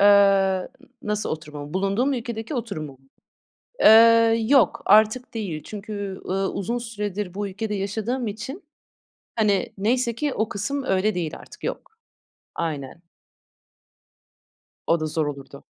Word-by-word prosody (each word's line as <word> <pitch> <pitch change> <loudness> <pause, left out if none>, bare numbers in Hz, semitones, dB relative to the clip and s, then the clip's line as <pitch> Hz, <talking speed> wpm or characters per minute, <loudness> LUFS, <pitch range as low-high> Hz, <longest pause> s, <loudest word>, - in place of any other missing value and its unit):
Eee, 200 - +6 0.7
n 275 - -20
nasıl 210 0 -2
oturumumu? 150 -1 -6
Bulunduğum 200 +8 +1
ülkedeki 235 0 -4
oturumu 200 - -4
mu? 130 - -20 0.8
Eee, 230 0 +7
yok, 265 -10 +4
artık 215 +5 +4
değil. 190 -9 -4
Çünkü, 205 -2 -6
ııı, 195 +1 0
uzun 230 +5 -2
süredir 210 -5 -4
bu 205 +1 -3
ülkede 210 +2 -4
yaşadığım 220 +5 -2
için, 230 - -6 0.7
hani, 210 -3 +1
neyse 235 +3 +1
ki 290 +1 -1
o 220 +1 -1
kısım 275 +8 -2
öyle 190 -2 +1
değil 165 -3 -3
artık, - - -15
yok. 445 -3 -5 0.6
Aynen. 150 0 -4 1.8
O 165 - +4
da 155 - -1
zor 155 0 -1
olurdu. 140 -1 -8
210 Hz, 130 wpm, -24 LUFS, 185-230 Hz, 1.8 s, Eee